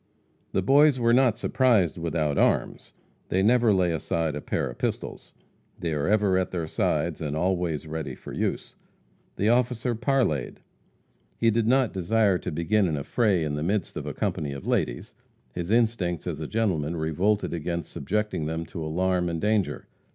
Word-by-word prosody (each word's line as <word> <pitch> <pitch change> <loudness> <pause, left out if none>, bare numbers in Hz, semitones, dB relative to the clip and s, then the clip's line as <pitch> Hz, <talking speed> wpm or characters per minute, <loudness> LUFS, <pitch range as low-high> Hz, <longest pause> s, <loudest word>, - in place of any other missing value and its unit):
The - - 0
Boys 140 0 +5
were 115 0 +3
not 125 -3 +4
surprised 115 - +2
without 80 -3 -1
arms. - - 0 0.4
They 95 +1 +1
never 120 +1 +4
lay 90 -3 +2
aside 80 0 -1
a 75 - -4
pair - - -2
of - - -9
pistols. - - -4 0.4
They 85 -2 -2
are 75 -1 -1
ever 100 -3 +3
at 95 - -1
their 85 -3 -3
sides, 80 - -1
and 75 -2 -2
always 85 -3 -1
ready 80 -1 -5
for - - -10
use. - - -3 0.6
The 105 - +1
officer 125 0 +1
parleyed. 115 - 0 0.8
He 115 - +3
did 110 0 +1
not 130 -1 +3
desire 100 0 +2
to - - -5
begin 95 +6 +1
an 80 -3 -1
affray 95 - +1
in 75 -2 -2
the 75 - -2
midst 95 +3 -1
of - - -5
a - - -3
company 70 -2 -2
of 70 - -8
ladies - - -1 0.4
his 85 +4 -4
instincts 110 -7 +1
as 80 -4 -4
a 80 - -4
gentleman 85 -8 -1
revolted 90 +7 0
against 85 0 -3
subjecting 105 -1 -2
them 80 +1 -3
to 80 - -6
alarm 90 +2 0
and 85 -1 -3
danger. 105 0 0
90 Hz, 175 wpm, -26 LUFS, 80-110 Hz, 0.8 s, Boys